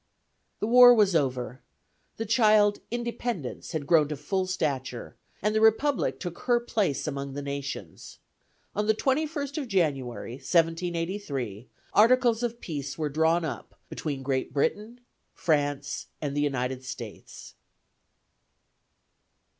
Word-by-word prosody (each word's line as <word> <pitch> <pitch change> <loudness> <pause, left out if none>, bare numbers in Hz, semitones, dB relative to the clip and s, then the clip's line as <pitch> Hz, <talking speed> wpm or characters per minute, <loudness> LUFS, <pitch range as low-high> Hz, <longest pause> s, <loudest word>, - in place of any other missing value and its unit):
The - - -1
war 245 +1 +8
was 205 -5 +3
over; 130 -3 -1 0.6
the 225 - -3
child 215 -2 +4
Independence 235 - -4
had 155 -3 -2
grown 155 -1 +4
to 150 - -4
full 185 +6 -1
stature, 135 -9 -3 0.3
and 210 +1 +2
the 215 - +2
Republic 225 +5 +2
took 175 -2 -6
her 240 -1 +2
place 210 - -1
among 140 -2 -4
the 145 - -3
nations. 140 -1 -6 0.6
On 210 +1 0
the 220 - +4
21st 285 +3 -1
of 275 - -4
January, 135 - -1
1783, 165 - -1 0.3
articles 235 +1 +4
of 235 -1 -2
peace 145 - -5
were 155 -2 -1
drawn 160 +3 +2
up 155 - -7
between 140 -4 -4
Great 130 -2 -1
Britain, 210 - -1 0.3
France, 145 -4 -1
and 145 -2 -3
the 145 - +1
United 130 -2 -1
States. 120 -4 -9
165 Hz, 125 wpm, -27 LUFS, 140-220 Hz, 0.6 s, war